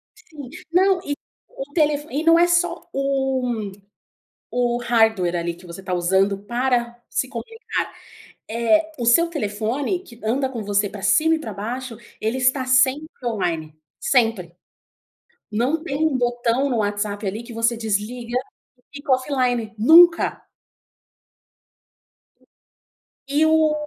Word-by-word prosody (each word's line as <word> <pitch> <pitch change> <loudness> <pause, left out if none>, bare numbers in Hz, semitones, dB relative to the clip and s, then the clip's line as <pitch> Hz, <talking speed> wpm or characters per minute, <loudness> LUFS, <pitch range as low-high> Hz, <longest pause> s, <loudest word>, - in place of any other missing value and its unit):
Sim. 310 - -12 0.2
Não, 375 +1 +4
eh, 290 -5 -3 0.4
o 275 +2 -9
telefo 300 -2 +1
e 295 +4 -1
não 330 0 +6
é 345 - +5
só 345 0 0
o 265 -6 -1 0.8
o 240 -1 +1
hardware 220 -7 +2
ali, 170 0 -2
que 175 +2 -16
você 175 +2 -9
tá 185 -1 -4
usando 190 +3 +2
para 240 +2 -1
se - - -1
comunicar, 455 0 -4 0.6
é 275 +9 +2
o 240 - -3
seu 335 +9 +5
telefone 255 - -2
que 235 -11 -15
anda 260 +5 0
com 240 -4 -6
você 205 0 +1
pra 200 - -9
cima 310 +12 +3
e - - -4
pra 225 - -6
baixo, 230 +3 -5 0.2
ele 225 +4 -1
está 260 +1 +2
sempre 260 +3 +3 0.2
online, 170 -10 -3 0.2
sempre, 225 -9 +1 1.0
não 260 +10 0
tem 295 0 -1
um 285 -5 +1
botão 245 +2 0
no 245 - 0
WhatsApp 205 0 -2
ali 210 +4 -3
que 235 - -10
você 230 +1 +1
desliga 230 +3 -3 0.4
e 250 - -33
fica 285 -1 -2
offline, 250 -4 0
nunca! 335 +8 +6 2.9
E 290 +3 +2
o 315 -1 +4
245 Hz, 135 wpm, -22 LUFS, 215-285 Hz, 2.9 s, não